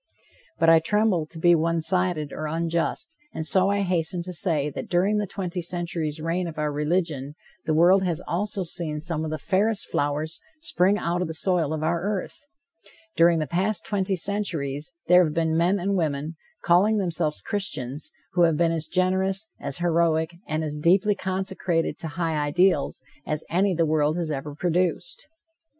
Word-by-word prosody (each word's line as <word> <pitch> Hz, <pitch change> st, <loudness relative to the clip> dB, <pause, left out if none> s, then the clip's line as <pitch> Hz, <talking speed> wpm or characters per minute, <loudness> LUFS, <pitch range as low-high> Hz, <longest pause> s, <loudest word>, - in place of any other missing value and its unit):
But 165 Hz, -, +2 dB
I 165 Hz, 0 st, +7 dB
tremble 195 Hz, -2 st, +1 dB
to 165 Hz, -, -10 dB
be 175 Hz, +2 st, +5 dB
one 165 Hz, 0 st, +1 dB
sided 175 Hz, -3 st, 0 dB
or 155 Hz, -, -4 dB
unjust, 165 Hz, +5 st, -2 dB, 0.2 s
and 160 Hz, -, -2 dB
so 190 Hz, +4 st, +4 dB
I 200 Hz, 0 st, +1 dB
hasten 180 Hz, -2 st, -1 dB
to 180 Hz, +1 st, -7 dB
say 155 Hz, -5 st, +2 dB
that -, -, -7 dB
during 190 Hz, +4 st, +2 dB
the 210 Hz, -1 st, -1 dB
twenty 180 Hz, -2 st, -4 dB
centuries' 170 Hz, -3 st, -3 dB
reign 170 Hz, +3 st, -1 dB
of 160 Hz, -2 st, -8 dB
our 150 Hz, -1 st, -1 dB
religion, 150 Hz, -2 st, -1 dB, 0.3 s
the 155 Hz, -, +2 dB
world 180 Hz, +4 st, +5 dB
has 175 Hz, -4 st, -1 dB
also 200 Hz, +2 st, -2 dB
seen 165 Hz, -3 st, -2 dB
some 160 Hz, 0 st, -3 dB
of 160 Hz, -, -3 dB
the 155 Hz, -, -3 dB
fairest 200 Hz, +7 st, 0 dB
flowers 150 Hz, +3 st, -1 dB, 0.2 s
spring 200 Hz, -, +2 dB
out 175 Hz, -2 st, -1 dB
of 180 Hz, -, -1 dB
the 160 Hz, -, -6 dB
soil 170 Hz, -3 st, +1 dB
of 155 Hz, -1 st, -2 dB
our 170 Hz, +1 st, 0 dB
earth. 205 Hz, +8 st, -4 dB, 0.7 s
During 170 Hz, 0 st, +5 dB
the 155 Hz, -, 0 dB
past 185 Hz, +4 st, 0 dB
twenty 195 Hz, -1 st, 0 dB
centuries 170 Hz, -5 st, -2 dB
there 180 Hz, +1 st, +6 dB
have 155 Hz, -2 st, -2 dB
been 160 Hz, -1 st, +1 dB
men 175 Hz, +4 st, +3 dB
and 195 Hz, +3 st, -1 dB
women, 155 Hz, -2 st, -1 dB, 0.3 s
calling 195 Hz, +6 st, +4 dB
themselves 170 Hz, -5 st, -1 dB
Christians, 150 Hz, -, -3 dB, 0.2 s
who 180 Hz, -, +2 dB
have 165 Hz, -3 st, +4 dB
been 165 Hz, 0 st, +2 dB
as 160 Hz, -1 st, -1 dB
generous, 190 Hz, +3 st, +1 dB
as 140 Hz, -1 st, -3 dB
heroic 170 Hz, -1 st, +1 dB
and 155 Hz, +1 st, -1 dB
as 150 Hz, -1 st, -3 dB
deeply 185 Hz, +7 st, +3 dB
consecrated 185 Hz, -4 st, -2 dB
to 165 Hz, -, -5 dB
high 165 Hz, -1 st, -2 dB
ideals 150 Hz, -2 st, +1 dB, 0.2 s
as 150 Hz, +1 st, -3 dB
any 185 Hz, +2 st, +2 dB
the 165 Hz, 0 st, +2 dB
world 155 Hz, 0 st, +1 dB
has 165 Hz, -3 st, -2 dB
ever 145 Hz, 0 st, -5 dB
produced. 175 Hz, +1 st, -1 dB
170 Hz, 180 wpm, -25 LUFS, 155-185 Hz, 0.7 s, I